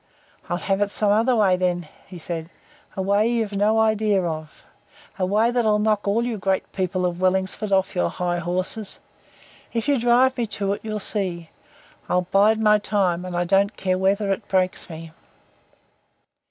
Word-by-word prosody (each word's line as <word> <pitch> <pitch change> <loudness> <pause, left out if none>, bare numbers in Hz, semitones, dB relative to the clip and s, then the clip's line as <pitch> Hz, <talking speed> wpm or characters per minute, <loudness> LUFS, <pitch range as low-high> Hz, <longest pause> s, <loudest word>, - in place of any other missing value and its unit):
"I'll 175 - 0
have 195 +2 -1
it 205 - +2
some 205 0 +1
other 230 +4 +3
way, 200 -4 +4
then," 175 -2 -1 0.2
he 185 - -10
said. 165 0 -6 0.5
"A 190 - -1
way 200 +3 +2
you've 225 -3 -1
no 210 +2 +2
idea 215 -3 +2
of. 155 -2 -6 0.6
A 185 - +1
way 215 +5 +2
that'll 225 -4 +2
knock 210 -1 0
all 225 +4 +1
you 230 -4 -3
great 190 0 -1
people 185 -1 -1
of 175 0 -3
Wellingsford 190 +2 0
off 190 -1 +2
your 85 -1 0
high 175 - -2
horses. 185 +5 -3 0.7
If 230 +3 -2
you 285 -3 +2
drive 245 +3 +3
me 235 - 0
to 200 -1 0
it, 205 - -6
you'll 215 -1 -3
see. 180 -5 -2 0.6
I'll 180 0 +2
bide 210 +3 +4
my 210 -1 +4
time 190 -4 0
and 180 -1 -4
I 175 - +1
don't 195 +3 +1
care 185 -1 0
whether 195 +1 +1
it 205 +1 -3
breaks 185 -2 0
me." 165 0 -9
195 Hz, 180 wpm, -23 LUFS, 180-215 Hz, 0.7 s, way